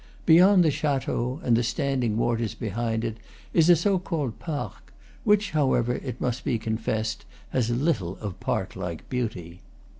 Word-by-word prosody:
Beyond 180 +3 +7
the 155 - +4
chateau 135 -2 -1
and 120 - +3
the 115 - +3
standing 125 -2 0
waters 115 -2 0
behind 115 +1 -2
it 110 -1 -3 0.4
is 165 0 +4
a 175 - +9
so 185 +3 +2
called 155 - -3
parc, 150 -4 -5 0.3
which, 210 -2 +3
however, 130 -5 +2
it 125 -2 -5
must 125 0 -2
be 120 - 0
con 110 0 -2
fessed, 110 0 -2 0.3
has 120 -3 +1
little 120 - 0
of 100 -4 -6
park - - -2
like 85 -2 -5
beauty. 95 -9 -4
120 Hz, 160 wpm, -26 LUFS, 110-150 Hz, 0.4 s, a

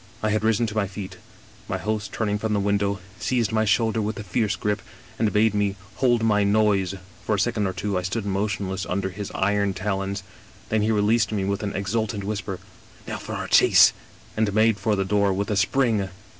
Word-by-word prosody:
"I 110 - +2
had 110 0 0
risen 115 +1 +2
to 105 - -4
my 105 -2 +1
feet. 95 0 -7 0.5
My - - -2
host, 105 0 -3
turning 105 -2 -1
from 110 0 -1
the 105 - +2
win 100 0 +1
dow, 100 0 0 0.2
seized 120 -5 0
my 110 0 +2
shoulder 110 +2 +2
with 105 +1 -2
a 110 - -5
fierce 105 +2 0
grip, 105 -1 -1 0.4
and 110 -2 +2
bade 110 0 +3
me 100 -1 +1
^ - - -17 0.2
hold 120 -3 +2
my 105 -2 +3
noise 100 -2 +2
'; 95 - -24
for 110 - +1
a - - -2
second 105 -1 +1
or 95 - -3
two 95 +1 -1
I - - -3
stood 100 +4 -3
motionless 100 -1 -2
under 95 +1 -1
his 100 +1 -6
iron 100 0 +1
talons, 95 0 -2 0.5
then 110 -1 +1
he 105 - +1
released 110 +2 +2
me 100 -3 -1
with 100 +1 -1
an 105 -2 -3
ex 100 +1 -3
ultant 110 -3 -1
whisper: 100 -2 -3 0.3
" - - -24
Now - - -3
for - - -7
our - - -4
chase! - - +6 0.2
" - - -25
and 110 -1 +1
made 110 -1 +4
for 105 +2 +1
the 95 -1 0
'door 100 0 +2
with 100 +2 -2
a - - +1
spring. 105 -1 +1
105 Hz, 230 wpm, -24 LUFS, 100-110 Hz, 0.5 s, chase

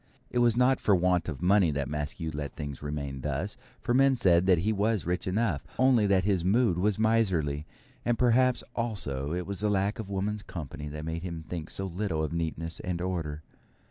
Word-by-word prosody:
It 125 - +1
was 120 -1 +4
not 125 +1 +4
for 100 - +3
want 90 -1 +2
of 80 +1 -6
money 95 -1 +5
that 70 -2 -1
Maskew 75 +3 -3
let 75 -2 -5
things 75 -3 -6
remain 70 -2 -4
thus, 75 +9 -2 0.2
for 120 - -1
men 135 +1 +5
said 95 -6 +4
that 90 -2 +6
he 105 +7 +1
was 105 -1 0
rich 90 +2 -2
enough, 95 -7 0
only 125 -5 +4
that 95 -2 +3
his 95 -3 +1
mood 100 -1 +3
was 105 +1 +1
miserly; 90 -10 +1 0.4
and 120 -1 +1
perhaps, 125 +1 +3
also, 75 - -2
it 90 +1 -2
was 100 -1 -5
the 105 +1 +1
lack 100 +3 0
of 105 -3 -5
woman's 100 +2 -2
company 75 -6 -7
that 75 +1 -6
made 80 +1 -3
him 85 -3 -5
think 80 0 -6
so 95 - -3
little 90 -3 -2
of 80 - -3
neatness 80 0 -3
and 90 -1 -3
order. 80 -4 -3
90 Hz, 205 wpm, -29 LUFS, 80-105 Hz, 0.4 s, that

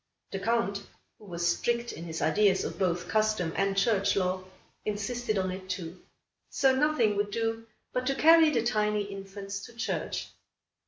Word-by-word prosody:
The 195 - -3
Count, 200 -2 0 0.4
who 215 - -15
was 175 -2 -2
strict 235 +7 0
in 165 - -8
his 160 -1 -4
ideas 200 -3 +3
of - - -5
both 180 -2 0
custom 215 -6 +1
and 195 0 0
church 200 -1 +2
law, 185 -1 0 0.4
insisted 215 +2 -2
on 185 -1 0
it 185 0 -8
too. 180 -1 -5 0.5
So 265 -1 +3
nothing 265 -7 +2
would 205 0 0
do 225 +1 -2 0.3
but 250 0 -1
to 275 - +1
carry 325 +2 +7
the 240 -7 +1
tiny 210 -3 +1
infants 195 0 -7
to 235 - -15
church. 230 - -3
205 Hz, 165 wpm, -29 LUFS, 190-235 Hz, 0.5 s, carry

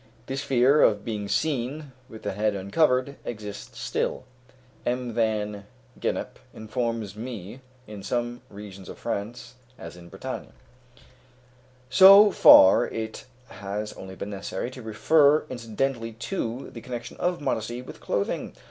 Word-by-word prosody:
This 135 +2 -3
fear 135 +3 +4
of 105 -2 +3
being 105 -3 -3
seen 145 +3 -2 0.2
with 110 - -11
the 105 - -2
head 105 +1 0
uncovered 130 +7 +1
exists 105 -3 -7
still, - - -2 0.6
M. 125 -1 -2
Van 105 -3 -1 0.3
Gennep - - -3 0.2
informs 110 -2 -3
me, 115 0 -7 0.2
in 105 -2 -9
some 120 +3 -3
regions 100 -2 -10
of - - -9
France, 115 +4 -5 0.2
as 85 +1 -9
in 85 -1 -13
Brittany. - - -6 1.4
So 200 +2 +9
far 95 - +8
it 110 +4 -6 0.2
has 100 +2 -5
only 95 0 -10
been 100 +2 -6
necessary 100 +4 -4
to 130 - -10
refer 145 +8 +3
incidentally 115 0 -3
to 115 +2 -4
the 115 - -9
connection 120 -1 -7
of 180 0 -1
modesty 120 -3 -3
with - - -11
clothing. 100 - -2
115 Hz, 130 wpm, -26 LUFS, 105-130 Hz, 1.4 s, So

